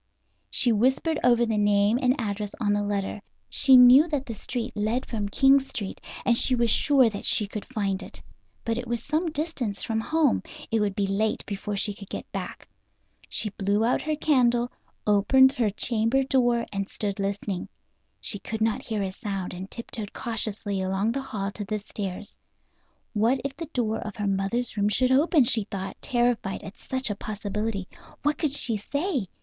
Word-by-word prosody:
She 245 - +3
whispered 260 +8 +2
over 240 -1 +4
the 220 -2 0
name 205 +2 +3
and 255 +2 +2
address 210 0 -3
on 205 -3 +1
the 205 - +1
letter. 205 0 -2 0.3
She 265 -2 +7
knew 250 +5 +8
that 290 -4 -2
the 230 - -5
street 240 +3 -5
led 220 +4 -1
from 210 -3 -3
King 270 +5 +5
Street, 225 -7 -6 0.2
and 240 - +4
she 255 +2 +3
was 235 -2 +2
sure 275 -4 +5
that 205 -3 -4
she 210 - +2
could 205 +1 -6
find 200 -6 -2
it. - - -8 0.5
But 230 +1 0
it 245 - -6
was 235 0 -2
some 315 +4 0
distance 285 - -3
from 225 -1 -1
home; 310 0 +2 0.3
it 225 - +2
would 205 -2 0
be 200 - +1
late 205 +3 -1
before 205 0 -4
she 205 +1 0
could 200 0 -12
get - - -5
back. - - -6 0.6
She 210 - 0
blew 205 +3 0
out 245 - +1
her 310 0 -1
candle, 245 -5 +2 0.3
opened 260 +6 +5
her 230 -5 +1
chamber 230 +5 +2
door 245 -3 +2
and 195 0 -3
stood 200 -1 -3
listening. 195 -1 -3 0.5
She 205 - -3
could 220 +2 -5
not 220 -1 +1
hear 215 -3 -2
a 190 - -2
sound, 195 -3 -4
and 185 +2 -7
tiptoed 220 -3 -7
cautiously 215 -3 -3
along 190 +4 0
the 270 +3 -2
hall 205 -7 -4
to 205 - -6
the 215 +1 -2
stairs. 205 -1 -6 0.7
What 230 +5 +2
if 275 -1 -3
the 330 - -6
door 235 -7 -1
of 215 -2 -6
her 210 -2 -3
mother's 195 +6 -1
room 205 0 +2
should 255 +5 +2
open, 295 +2 +4
she 225 -3 +3
thought, 195 -1 -5
terrified 240 -5 0
at 195 - -9
such 260 -3 -3
a - - -2
possibility. 210 -1 -4 0.4
What 295 +1 +1
could 300 -4 0
she 235 -6 +2
say? 280 - -2
225 Hz, 190 wpm, -26 LUFS, 205-255 Hz, 0.7 s, knew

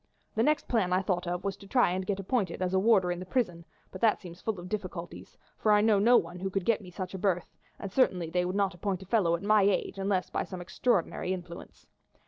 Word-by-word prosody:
The 220 - 0
next 300 +4 +2
plan 210 -7 +1
I 185 +1 +2
thought 180 -2 -1
of 175 0 -2
was 200 -1 -2
to 200 - -14
try 245 -3 +3
and 185 +1 -3
get 200 -1 -1
appointed 195 -3 -1
as 185 0 -1
a 190 - +4
warder 195 -4 +4
in 175 - -3
the 185 - -6
prison, 180 -8 -1 0.3
but 185 - -9
that 220 -2 +4
seems 175 -2 -11
full 220 -4 -2
of 175 - -8
difficulties, 185 -4 -6 0.2
for 215 - +2
I 210 0 +5
know 215 -2 +4
no 240 +4 +6
one 175 +1 -3
who 190 +1 -2
could 190 -1 -2
get 230 -2 +2
me 185 - -11
such 185 +1 -6
a 190 - -5
berth, 180 -3 -1 0.2
and 200 - -6
certainly 180 -9 +1
they 180 +1 +1
would 180 +2 -2
not 200 -1 +1
appoint 190 +1 -3
a - - -13
fellow 190 -5 +2
at 170 - -7
my 210 0 +4
age 195 0 +1
unless 195 -2 0
by - - -1
some 185 - -7
extraordinary 185 -1 0
influence. 175 -1 -9
190 Hz, 255 wpm, -29 LUFS, 180-210 Hz, 0.3 s, no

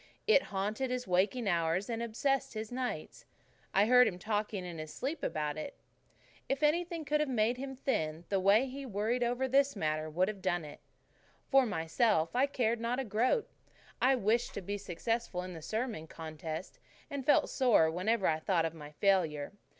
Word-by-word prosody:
It 435 -10 +6
haunted 210 +6 -2
his 250 0 -2
waking 200 +6 +1
hours 170 +1 +1
and 230 -1 -3
obsessed 235 +3 -1
his 215 +1 -5
nights. 250 0 -4 0.4
I 200 +2 +4
heard 250 +1 +6
him 185 -5 -3
talking 210 -1 -2
in 170 -2 -7
his 155 0 -6
sleep 290 +4 -4
about 150 - -2
it. - - -7 0.7
If 275 +2 -1
anything 335 +1 +1
could 300 +1 +1
have 300 -2 0
made 240 0 +1
him 270 +1 -5
thin 165 - -2
the 195 - +1
way 200 +6 +5
he 275 +2 -7
worried 230 +1 -1
over 245 +2 0
this 275 +1 +3
matter 155 -3 -1
would 180 +4 +1
have 205 -2 -5
done 175 -4 0
it. 145 - -10 0.7
For 270 -2 +5
myself, 165 0 +1
I 265 +3 +4
cared 235 -4 0
not 235 +2 -1
a 265 - -2
groat. 240 - +1 0.5
I 255 - +5
had 260 -5 +2
wished 230 +4 +1
to 200 - -3
be 200 +2 -3
successful 200 0 -2
in 185 0 -7
the 165 - -8
sermon 220 -4 -3
contest, 160 +1 -7 0.3
and 280 -1 -3
felt 290 - +3
sore 230 - +4
whenever 190 +4 0
I 155 -1 +2
thought 165 0 +1
of 165 - -2
my 150 -3 -10
failure. 165 -5 +1
215 Hz, 190 wpm, -32 LUFS, 175-255 Hz, 0.7 s, It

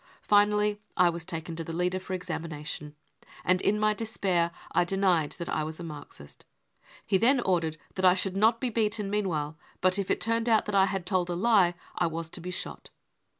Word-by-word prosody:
Finally 210 0 +3 0.2
I 180 -2 +5
was 170 0 -5
taken 165 -1 -5
to 165 - -3
the 165 0 -6
leader 180 +2 0
for 185 0 -7
examination, 160 -4 -5 0.5
and 185 0 +3
in 210 +1 +2
my 215 0 +3
despair 195 -6 0 0.2
I - - +3
denied 180 -4 +1
that 170 - -6
I 155 - -1
was 155 +2 -5
a - - -6
Marxist. 145 - -10 0.6
He 190 -2 +2
then 260 +5 +4
ordered 170 -6 0 0.2
that 185 - -1
I 180 0 +7
should 190 0 -1
not 220 +3 +4
be 250 -1 -1
beaten 210 -2 0
meanwhile, 160 -7 -1 0.2
but 185 +1 +2
if 195 - -2
it, - - +1
turned 230 +1 0
out 220 -2 +4
that 210 - -4
I 195 -1 +5
had 190 -2 -3
told 180 -1 0
a 175 - -1
lie 190 -3 +4 0.2
I - - +1
was 165 0 -5
to 180 - -4
be 180 - -6
shot. 180 - -6
185 Hz, 205 wpm, -28 LUFS, 170-210 Hz, 0.6 s, I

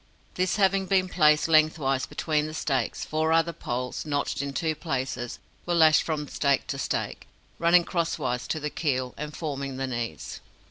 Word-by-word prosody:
This 185 +1 0
having 195 -1 +2
been 185 -1 +3
placed 150 -4 +4
lengthwise 155 -4 +3
between 155 -1 -1
the 155 - -7
stakes, 135 -6 -1
four 155 +1 0
other 165 +1 +3
poles, 125 -5 -4
notched 145 -1 -1
in 140 0 -3
two 155 +4 -1
places, 130 -6 -3 0.3
were 175 - +1
lashed 160 -2 +6
from 150 -2 -3
stake 140 -2 +1
to 135 - -3
stake, - - -3 0.3
running 170 +1 +5
crosswise 155 -8 -2
to 160 - -2
the 150 0 -3
keel, 130 -5 -1
and 150 +1 -6
forming 140 -4 -4
the 135 - -1
knees. 120 -3 -5
150 Hz, 170 wpm, -27 LUFS, 135-165 Hz, 0.3 s, lashed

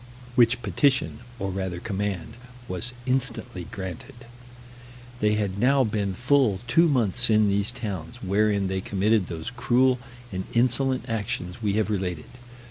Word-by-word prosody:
Which 120 0 +4
petition, 135 -5 +1 0.2
or 95 -3 -3
rather 95 -2 -3
command, 100 0 -3 0.3
was 95 +8 -3
instantly 125 -7 -2
granted. 95 - -7 1.0
They 105 -1 +3
had 100 -2 -2
now 135 +3 +4
been 105 -4 -1
full 125 -4 +3
two 165 +7 +4
months 120 -3 +2
in 110 -1 +4
these 100 +2 +1
towns, 100 -9 -5
wherein 100 +1 +2
they 95 0 -1
committed 100 0 +1
those 85 +5 -5
cruel 125 +1 +2 0.3
and 95 -1 -4
insolent 130 +2 +2
actions 105 -4 -3
we 105 -3 +1
have 110 +1 +1
related. 90 -5 -2
105 Hz, 135 wpm, -25 LUFS, 95-125 Hz, 1.0 s, Which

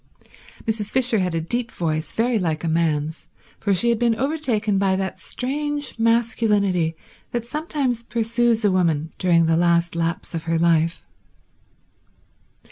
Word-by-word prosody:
Mrs. 215 -2 -2
Fisher 245 -3 +2
had 180 -2 -1
a 165 - 0
deep 240 +8 -2
voice, 155 -2 -2
very 230 0 +1
like 160 -4 -2
a - - -1
man's, 160 -1 -1 0.3
for 200 - -1
she 200 +5 +4
had 235 -2 +1
been 235 -1 +2
overtaken 235 -7 0
by 195 -1 +2
that 190 0 -3
strange 290 +1 -2
masculinity 210 -7 +2 0.3
that 240 -1 -3
sometimes 280 -3 -2
pursues 235 -1 0
a 205 - +4
woman 165 -4 +1
during 170 -2 +3
the 165 0 +2
last 170 0 +2
laps 165 +1 -2
of 165 -1 -4
her 165 0 +1
life. 165 0 +2
200 Hz, 145 wpm, -22 LUFS, 165-235 Hz, 0.3 s, she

